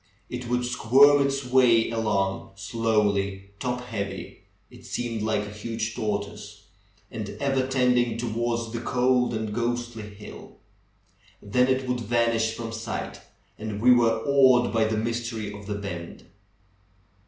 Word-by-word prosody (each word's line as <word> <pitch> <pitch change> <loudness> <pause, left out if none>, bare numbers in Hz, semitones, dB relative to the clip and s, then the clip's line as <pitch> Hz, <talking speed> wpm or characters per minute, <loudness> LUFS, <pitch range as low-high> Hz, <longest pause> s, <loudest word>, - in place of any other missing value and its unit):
It 125 0 -5
would 125 0 0
squirm 135 +4 +5
its 135 -1 -2
way 125 -3 +4
along 100 -4 -1
slowly, 100 -2 0
top 125 -1 -2
heavy 100 -5 -6 0.3
(it - - -14
appeared 115 -3 -3
like 110 -1 0
a 105 - -8
huge 115 +1 -4
tortoise), 105 -2 -4 0.5
and 110 -3 -5
ever 135 -2 +1
tending 125 -3 +2
towards 115 0 -2
the 115 - -3
cold 125 0 +2
and 110 -1 -3
ghostly 120 -2 -3
hill. 105 0 -12 0.8
Then 125 +5 +2
it 130 0 0
would 125 0 -1
vanish 115 0 +1
from 115 -1 -5
sight, 115 0 -5 0.4
and 105 -1 -4
we 125 +3 +5
were 115 -2 +4
awed 130 -4 +5
by 115 -1 +3
the 110 0 -1
mystery 115 -2 -3
of 100 -1 -10
the 105 - -2
bend. 85 -4 -7
115 Hz, 140 wpm, -26 LUFS, 105-125 Hz, 0.8 s, squirm